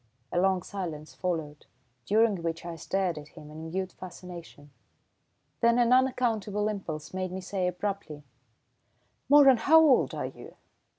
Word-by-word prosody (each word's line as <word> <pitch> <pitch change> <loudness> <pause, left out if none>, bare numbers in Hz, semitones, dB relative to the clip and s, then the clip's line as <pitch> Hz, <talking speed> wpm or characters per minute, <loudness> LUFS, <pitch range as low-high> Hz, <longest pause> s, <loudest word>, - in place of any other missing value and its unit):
A 175 - +1
long 190 -1 +2
silence 165 -7 -6
followed, 160 -5 -4 0.4
during 215 -3 +3
which 165 0 -4
I 170 -1 -5
stared 180 -1 -2
at 145 - -12
him 150 0 -13
in 160 +1 -8
mute 185 +2 -3
fascination. 175 -5 -11 0.9
Then 235 0 +4
an 240 0 +4
unaccountable 225 -5 +1
impulse 170 -8 -6
made 185 -1 -3
me 185 - -4
say 185 0 -2
abruptly: 180 -5 -4 1.1
"Moeran, 280 -3 +7
how 315 +8 +6
old 300 -5 +4
are - - -3
you?" - - -10
185 Hz, 140 wpm, -28 LUFS, 165-215 Hz, 1.1 s, Moeran